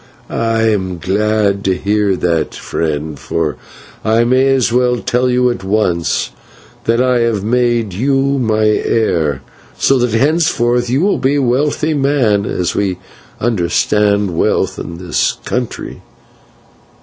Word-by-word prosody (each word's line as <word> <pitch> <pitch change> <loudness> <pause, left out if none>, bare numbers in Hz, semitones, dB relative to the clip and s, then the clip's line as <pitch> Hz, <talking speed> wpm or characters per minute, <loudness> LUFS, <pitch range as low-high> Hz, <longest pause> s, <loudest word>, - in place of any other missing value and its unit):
"I 115 -1 0
am 95 -5 0
glad 100 +2 0
to 95 -1 +2
hear 100 0 +1
that, 85 -3 -1
friend, 75 -2 -3
for 80 -4 -2 0.5
I 115 +2 +3
may 130 +3 +3
as 120 -3 +1
well 125 0 +2
tell 125 +2 0
you 125 0 +2
at 120 - -6
once 95 -4 0 0.5
that 115 +1 +2
I 125 -1 +2
have 115 -4 0
made 120 -2 +1
you 135 +5 +1
my 110 -3 +1
heir, 85 - +1 0.3
so 135 -1 +3
that 120 -2 +1
henceforth 125 -4 +1
you 130 +4 +1
will 200 +2 +1
be 135 +2 +1
a 145 - +1
wealthy 145 +5 0
man 135 -8 +1
as 90 -2 -1
we 95 -3 -1 0.4
understand 100 -1 +1
wealth - - 0
in 85 - -7
this 90 -2 0
country." 125 -2 -4
110 Hz, 135 wpm, -15 LUFS, 95-125 Hz, 0.5 s, I